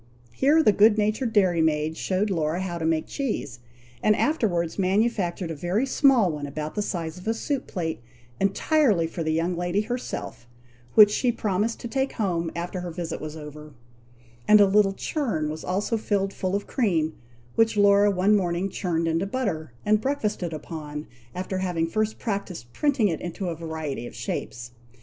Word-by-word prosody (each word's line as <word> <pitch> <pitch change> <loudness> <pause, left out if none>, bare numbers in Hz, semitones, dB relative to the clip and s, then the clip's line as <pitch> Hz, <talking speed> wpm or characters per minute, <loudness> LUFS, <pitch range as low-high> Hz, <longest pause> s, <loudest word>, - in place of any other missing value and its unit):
Here 300 +4 +4
the 215 - +6
good 210 +1 +5
natured 215 +3 0
dairy 185 -6 +3
maid 155 0 +1
showed 195 +4 -1
Laura 160 -1 0
how 175 -2 -3
to 160 - -2
make 160 -1 +1
cheese, 215 - -3 0.4
and 215 - +4
afterwards 200 - 0
manufactured 190 -3 0
a - - -4
very 180 - 0
small 265 - +4
one 145 -1 -5
about 150 +2 -5
the 210 - -1
size 170 -4 -4
of 180 - -11
a 225 - +1
soup 275 +3 -3
plate, 165 - -3 0.4
entirely 200 - +2
for 165 +1 -5
the 160 -1 0
young 165 +3 0
lady 175 +3 0
herself, 215 - -5 0.5
which 210 -1 +9
she 245 +3 +1
promised 215 0 -1
to - - -4
take 265 +3 -1
home 170 -6 -1
after 175 +2 -4
her 180 0 -5
visit 170 0 -5
was 155 0 -6
over; 150 -1 -10 0.7
and 210 0 +8
a 205 - +8
little 195 0 +3
churn 195 - -2
was 155 - -7
also 200 +5 -1
filled 195 -2 -1
full 185 +1 -2
of 200 - -2
cream, 165 -10 0 0.4
which 225 -1 +2
Laura 200 0 +5
one 200 +2 +3
morning 180 -1 0
churned 170 -4 -1
into 165 +4 0
butter, 195 - -2
and 210 0 +3
breakfasted 215 -10 -1
upon, 150 -1 -6 0.3
after 185 +1 -3
having 175 -3 0
first 215 +5 -1
practised 195 - -4
printing 280 -7 +2
it 165 -5 -2
into 175 +2 -4
a 165 - -3
variety 160 -6 -5
of - - -11
shapes. 120 0 -5
185 Hz, 175 wpm, -25 LUFS, 165-215 Hz, 0.7 s, which